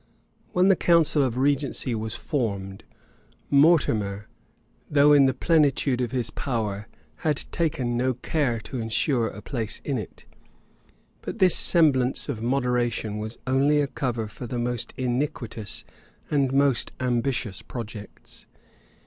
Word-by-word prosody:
When 180 +1 +3
the 195 - +6
council 165 -4 +3
of 125 -3 0
regency 140 -1 0
was 110 0 -3
formed, 100 -8 -3 0.7
Mortimer, 115 - +3 0.6
though 145 0 +5
in 140 -2 +6
the 130 - +1
plenitude 145 -5 +2
of 120 - -1
his 125 0 -2
power, 110 -5 -3 0.3
had 150 -3 0
taken 130 -8 -1
no 130 +1 +1
care 130 -1 -1
to 130 +4 -6
insure 115 +2 +1
a 105 -1 -8
place 115 -6 -3
in 135 -4 -1
it; 105 - -10 1.0
but - - -6
this 185 -4 +5
semblance 135 -7 +3
of 115 -6 -3
moderation 120 -4 0
was 110 +2 -5
only 140 +3 +3
a 145 - +2
cover 125 -4 -3
to 105 +4 -8
the 120 - -4
most 120 0 -2
iniquitous 125 -4 -3 0.5
and 140 -3 +2
most 135 -3 +2
ambitious 120 -5 -1
projects. 115 -3 -9
125 Hz, 130 wpm, -25 LUFS, 115-140 Hz, 1.0 s, the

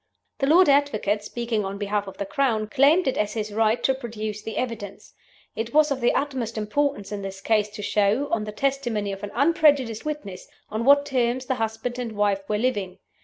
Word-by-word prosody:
The 270 - +1
Lord 350 +5 +6
Advocate 275 -8 +2
(speaking 230 -1 -2
on 195 +1 -4
behalf 205 0 -2
of 195 - -9
the 200 - -3
Crown) 225 -1 0
claimed 280 - +3
it 265 - 0
as 210 0 0
his 215 -1 -3
right 220 +2 +1
to 265 - +3
produce 220 -4 -5
the 220 +1 -6
evidence. 220 -5 -5 0.4
It 225 +4 -4
was 305 -1 +5
of 265 -2 -1
the 240 - +2
utmost 255 -6 -2
importance 215 0 -1
in 205 -1 -4
this 195 0 -6
case 210 0 +1
to 210 0 -8
show 210 +8 +1
(on 220 -2 0
the 210 - -5
testimony 240 -5 -1
of 195 0 -7
an 205 - -5
unprejudiced 280 -5 +3
witness) 295 -12 -6 0.2
on 220 +2 -2
what 285 +1 +6
terms 255 -2 0
the 260 - 0
husband 225 +1 -3
and 235 -3 -4
wife 205 -1 +1
were 210 - +1
living. 205 -6 -1
225 Hz, 205 wpm, -24 LUFS, 210-270 Hz, 0.4 s, Lord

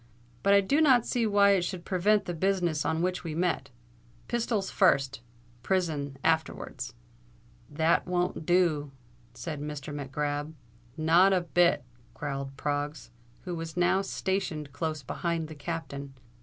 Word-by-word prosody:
"But 200 0 +5
I 200 - +6
do 280 +11 +2
not 260 -6 +5
see 235 -3 +1
why 200 -1 +5
it 195 -2 +4
should 175 0 -4
prevent 200 +2 +2
the 175 - -3
business 175 -3 0
on 160 +1 0
which 180 0 -1
we 160 -3 -4
met. 165 -5 0 0.6
Pistols 225 -4 -1
first—prison 135 +4 0
afterwards." 160 -6 -1 0.7
"That 160 +4 +2
won't 180 -2 -1
do," 155 -5 +2 0.4
said 155 -4 -5
Mr. 150 -1 -5
Mac 140 -2 -6
Grab. 145 +2 -2 0.4
"Not 170 +5 +5
a 185 - +3
bit," 170 -3 +3 0.3
growled 135 +1 -4
Proggs, 145 -3 -3 0.3
who 180 - -5
was 165 0 -6
now 180 +2 +3
stationed 190 -8 -2
close 155 -3 -3
behind 165 +4 -2
the 155 - -8
Captain. 140 -2 -6
165 Hz, 140 wpm, -29 LUFS, 145-185 Hz, 0.7 s, I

